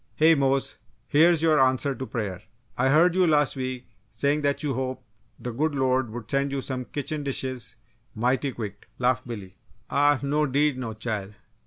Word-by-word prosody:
"Hey, 160 +1 +6
Mose! 135 -2 +1 0.3
Here's 165 +2 +4
your 155 -2 +4
answer 130 +1 +2
to 130 +1 -6
prayer! 100 -6 -4 0.3
I 130 +2 +2
heard 165 +5 +5
you, 185 -1 +3
last 150 -3 +3
week, 130 -1 -4 0.2
saying 140 +8 0
that 140 +1 0
you 145 -2 0
hoped 130 +1 -3 0.3
the 125 - -5
good 145 +5 -1
Lord 130 -2 +1
would 115 0 -7
send 140 0 +1
you 140 - -1
some 130 -1 -4
kitchen 150 +3 -4
dishes 130 -4 -4 0.4
mighty 125 +4 +1
quick!" 105 -4 -7
laughed 125 -1 +1
Billy. 100 -6 -8 0.3
"Ah 145 -1 +4
no 150 +2 +1
'deed 140 0 +1
no, 115 -4 -4
chile! 105 -3 -4
130 Hz, 175 wpm, -26 LUFS, 120-145 Hz, 0.4 s, Hey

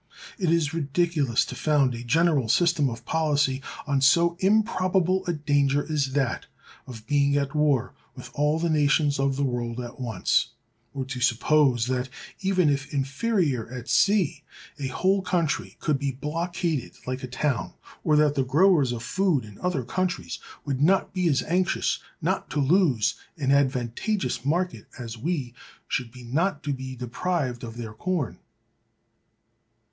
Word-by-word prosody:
It 180 -4 +1
is 165 -2 +2
ridiculous 150 -4 +1
to - - -7
found 145 -4 +2
a 120 0 -6
general 145 -1 +2
system 160 0 +3
of 115 0 -8
policy 145 -4 +1 0.2
on 140 -2 +1
so 170 +5 +4
improbable 190 -3 +2
a 175 - +1
danger 145 -2 +1
as 135 -3 0
that 135 -3 -1 0.4
of 115 -4 -10
being 140 +2 +2
at 140 0 -1
war 150 -5 +1 0.2
with 125 -2 -10
all 150 +3 +1
the 165 0 0
nations 145 -1 +2
of 135 0 +1
the 140 - -1
world 120 -2 -2
at 120 +1 -7
once; 110 -8 0 0.4
or 135 -1 -3
to 130 -1 -5
suppose 125 0 +3
that, 130 0 -2 0.3
even 190 -3 +2
if 140 -1 0
inferior 140 - 0
at 125 -1 -7
sea, 195 -8 +2 0.4
a 135 - -2
whole 190 +8 +1
country 170 -4 -1
could 150 -3 0
be 140 0 -1
blockaded 165 +1 -3
like 130 +1 -3
a 130 - -5
town, 130 0 -2 0.3
or 150 - +3
that 150 -1 +4
the 135 -2 +1
growers 150 0 +4
of 120 -1 -4
food 170 - +1
in 105 -2 -13
other 180 -8 -1
countries 185 +8 -2 0.3
would 140 -2 -2
not 190 +6 +3
be 180 -2 +1
as 140 -2 +2
anxious 180 +2 0 0.2
not - - -1
to 145 - -2
lose 140 - +3 0.2
an 135 -3 0
advantageous 130 - 0
market 160 - -1
as 115 -2 -6
we 140 -4 -2 0.3
should 125 -3 -2
be 125 0 -12
not 150 +6 -1
to 145 -1 -1
be 130 0 -6
deprived 125 +1 -2
of 115 0 -7
their 115 -2 -6
corn. 170 +2 -2
140 Hz, 160 wpm, -26 LUFS, 130-170 Hz, 0.4 s, so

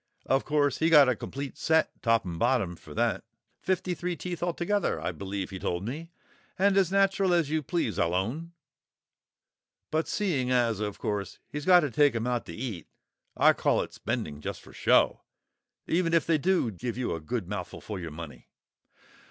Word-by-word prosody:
Of 135 +1 +1
course, 145 -3 +1
he 160 - +3
got 150 -4 +8
a 130 - +2
complete 140 +4 -6
set 160 0 +1
top 115 -3 +2
and 85 -2 -5
bottom 120 -7 +1
for 75 -3 -13
that, 115 -5 0 0.4
fifty 185 -1 0
three 175 0 -3
teeth 175 -1 -5
altogether 175 +4 0
I - - -2
believe 100 -1 -5
he 95 - -6
told 90 +2 -2
me, 155 +8 -5 0.5
and 195 +1 +3
as 190 -3 +3
natural 195 -2 +3
as 160 -4 +1
you 160 0 +1
please, 140 - -2
I'll 85 +1 +1
own. 140 - -2 1.4
But 160 +1 0
seeing 155 -12 0
as 120 -4 +2
of 105 -1 -3
course 100 -2 -3
he's 150 0 -5
got 180 -1 +8
to 145 -5 -2
take 145 +1 +4
'em 115 0 -1
out 125 -1 -1
to - - -7
eat, 110 -8 -5 0.5
I - - +6
call - - +1
it - - -10
spending 75 0 -4
just - - -5
for - - -15
show, - - +3 0.6
even 170 0 +1
if 165 - +3
they 160 -2 +2
do 175 -7 +2
give 115 +6 -5
you 125 -7 -1
a 80 - -5
good 95 +4 -3
mouthful 90 -3 -5
for 105 -3 -6
your 85 -2 -5
money." 75 -5 -9
130 Hz, 190 wpm, -28 LUFS, 100-165 Hz, 1.4 s, got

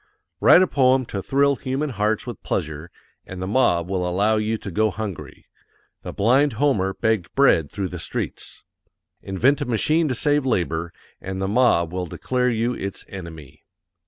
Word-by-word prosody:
Write 180 - +7
a - - +1
poem 130 -2 +3
to 100 -3 -5
thrill 140 +5 +2
human 135 +3 -3
hearts 105 -1 -1
with - - -7
pleasure, 80 +2 -4 0.4
AND 95 - -8
THE 95 - -3
MOB 95 -6 +2
WILL 95 -1 -1
ALLOW 100 +5 +1
YOU 110 +1 -1
TO 100 - -8
GO 110 +4 +2
HUNGRY: 105 -4 -7 0.6
THE - - -6
BLIND 130 +7 +2
HOMER 105 -7 +1
BEGGED 110 -5 -1
BREAD 85 - +3
THROUGH 95 -3 -3
THE 90 - -7
STREETS. - - -5 0.6
Invent 125 +10 +1
a - - -1
machine 155 +7 +1
to 130 - -1
save 145 +3 +1
labor 85 -9 -1 0.3
AND 95 0 -5
THE 95 - -1
MOB 100 -7 +2
WILL 90 -1 -3
DECLARE 125 +8 -1
YOU 120 +1 0
ITS 100 -4 -6
ENEMY. 80 -6 -10
110 Hz, 170 wpm, -22 LUFS, 90-130 Hz, 0.6 s, Write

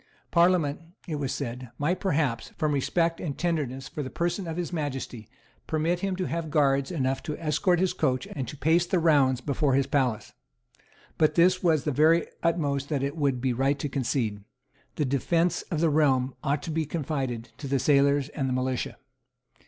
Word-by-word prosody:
Parliament, 170 -4 +3 0.3
it 155 -3 -2
was 135 -2 -2
said, 125 -2 -5
might 170 +6 0
perhaps, 150 - 0
from 155 -2 +1
respect 165 +4 0
and 145 -5 -4
tenderness 145 -6 -2
for 150 - -5
the 130 - -4
person 175 +4 -2
of 165 0 -4
His 175 0 -3
Majesty, 135 -8 -4 0.4
permit 160 +3 0
him 195 0 -1
to 185 0 -2
have 165 -1 -3
guards 140 -3 +2
enough 135 -6 -1
to 150 -3 -5
escort 175 +3 +1
his 185 0 +1
coach 130 0 0
and 135 -3 -4
to 150 - -8
pace 165 +5 +2
the 185 - +1
rounds 140 -6 +3
before 140 0 +1
his 135 0 +3
palace. 130 -6 -1 0.9
But 155 - +3
this 180 +2 +4
was 160 -5 +2
the 150 - 0
very 160 +4 +4 0.2
utmost 145 -5 0
that 140 -3 -1
it 140 +2 -2
would 140 -5 0
be 130 -1 +1
right 135 +3 +1
to 145 - -3
concede. 120 -6 -1 0.5
The 150 - 0
defence 165 +6 +1
of 160 -4 -1
the 165 - +4
realm 135 -4 +2
ought 145 +1 0
to 165 - -4
be 160 -1 -1
confided 135 -7 -3
to 140 - -5
the 135 +1 +1
sailors 140 +1 +3
and 135 -3 -2
the - - 0
militia. 130 -1 -2
145 Hz, 190 wpm, -27 LUFS, 135-165 Hz, 0.9 s, this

